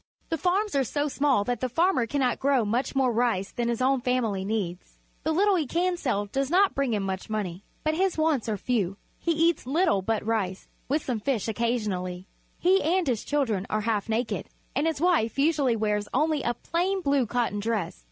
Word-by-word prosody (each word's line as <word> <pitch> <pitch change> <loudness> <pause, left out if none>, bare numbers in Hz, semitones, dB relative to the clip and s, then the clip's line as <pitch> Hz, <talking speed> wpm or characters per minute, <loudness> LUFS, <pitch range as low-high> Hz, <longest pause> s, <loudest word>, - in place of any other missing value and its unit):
The 325 - 0
farms 380 +5 +1
are 275 -1 +3
so 290 +4 -1
small 275 -6 +2
that 245 +1 -2
the 255 - -1
farmer 330 -3 +2
cannot 255 -1 0
grow 270 -4 +2
much 240 +7 -1
more 265 -2 +3
rice 225 -5 0
than 240 -1 -2
his 235 +1 -1
own 265 0 +2
family 235 -6 0
needs. 190 -4 -4 0.2
The 315 - 0
little 390 +4 +3
he 310 -5 -1
can 355 +5 +1
sell 225 -11 -1
does 270 +6 -2
not 380 +4 +4
bring 275 -3 0
him 205 - -1
much 190 +1 -4
money. 200 -4 -3 0.2
But 310 - +1
his 370 +2 +1
wants 310 -7 +1
are 210 - -1
few. 200 -4 -1 0.2
He 340 - 0
eats 330 -3 +2
little 305 - +2
but 220 +1 -1
rice, 200 -4 -1 0.2
with 295 +3 0
some 245 -4 -1
fish 230 -1 -1
occasionally. 210 -6 -2 0.3
He 375 +2 +3
and 345 +4 +1
his 245 -6 -1
children 230 -10 0
are 215 - 0
half 220 -1 -1
naked, 225 +1 -1 0.3
and 295 +3 +1
his 320 -3 -1
wife 325 -10 +2
usually 280 -4 +2
wears 210 -1 0
only 305 +1 +2
a 240 -1 -1
plain 370 +8 -1
blue 280 -6 +2
cotton 230 -3 -1
dress. 210 - -2
250 Hz, 200 wpm, -27 LUFS, 215-310 Hz, 0.3 s, not